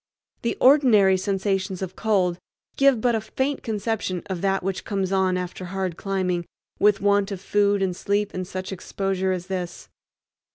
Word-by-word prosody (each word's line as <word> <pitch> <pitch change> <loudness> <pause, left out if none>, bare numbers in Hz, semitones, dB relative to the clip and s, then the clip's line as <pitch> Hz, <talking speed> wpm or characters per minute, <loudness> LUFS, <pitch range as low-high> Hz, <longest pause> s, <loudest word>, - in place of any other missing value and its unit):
The 235 - -1
ordinary 245 -9 +6
sensations 190 0 -1
of 190 0 -6
cold 185 -5 +1 0.4
give 275 -3 +4
but 245 0 +2
a 220 - 0
faint 265 +5 -2
conception 210 -4 -2
of 180 -2 -3
that 195 -1 +1
which 190 0 -2
comes 195 -3 -2
on 190 -1 +2
after 180 0 -5
hard 185 -1 -3
climbing 185 -3 -2 0.3
with 205 -1 +4
want 200 0 +3
of 195 - -4
food 200 +1 +2
and 185 -2 -1
sleep 205 +2 -1
in 185 - -3
such 185 +1 -6
exposure 190 0 -2
as 180 -1 -3
this. 180 -2 -5
195 Hz, 165 wpm, -24 LUFS, 185-205 Hz, 0.4 s, ordinary